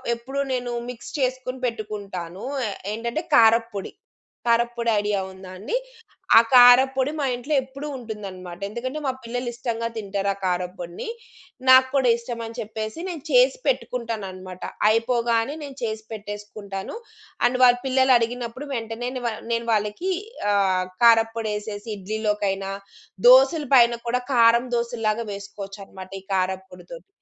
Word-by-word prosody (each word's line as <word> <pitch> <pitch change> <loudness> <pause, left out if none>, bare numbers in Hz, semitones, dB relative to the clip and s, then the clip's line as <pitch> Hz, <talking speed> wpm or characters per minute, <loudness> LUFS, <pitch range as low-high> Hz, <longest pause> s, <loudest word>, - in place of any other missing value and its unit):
ఎప్పుడు 265 +4 -6
నేను 245 -1 -2 0.2
మిక్స్ 240 -1 -8
చేసుకొని 255 0 -2
పెట్టుకుంటాను. 200 -5 -5 0.2
ఆహ్, 200 - -4 0.2
ఏంటంటే 235 +7 -3
కారప్పొడి. 230 -4 +3 0.6
కారప్పొడి 235 0 +2
ఐడియా 205 -1 0
ఉందా 190 0 -11
అండి? 215 - -3 0.6
ఆ - - +12
కారప్పొడి 260 +2 +7
మా 280 - 0
ఇంట్లో 250 +5 -4
ఎప్పుడూ 275 +3 -8
ఉంటుందన్నమాట. 195 -6 -8
ఎందుకంటే 255 +7 -4
మా 265 - +2
పిల్లలు 245 +1 -3
ఇష్టంగా 230 -1 -3
తింటారు 200 -2 -2
ఆ - - -14
కారప్పొడిని. 180 - -3 0.6
నాకు 260 0 +8
కూడా 260 -3 +3
ఇష్టం 235 0 -6
అని 230 +2 -10
చెప్పేసి 220 +3 -5
నేను 320 -5 -6
చేసి - - +5
పెట్టుకుంటానన్నమాట. 195 - -3 0.3
అయిపోగానే 230 +3 +1
నేను 280 -2 -8
చేసి 220 -1 -3
పెట్టేసుకుంటాను. 205 - -7 0.5
అండ్ 250 +1 -2
వాళ్ళ 245 0 +7
పిల్లలు 260 0 +4
అడిగినప్పుడు 240 +3 -3
వెంటనే 230 +1 -3
నేను 255 - -4
వా 230 - -1 0.2
నేను 230 0 -2
వాళ్ళకి 210 - -1 0.4
ఆహ్, 190 -2 +2 0.2
కారప్పొడేసేసి 225 -2 +2
ఇడ్లీలోకైనా, 200 -1 -2 0.6
దోసల 270 +5 +7
పైన 235 -1 +6
కూడా 250 +1 0
కారం 235 +1 +5
దోసల్లాగా 235 -1 -1
వేసుకోవచ్చన్నమాట 195 -1 -9
ఈ - - -26
కారప్పొడితోటి. 190 - -4
230 Hz, 125 wpm, -24 LUFS, 205-250 Hz, 0.6 s, ఆ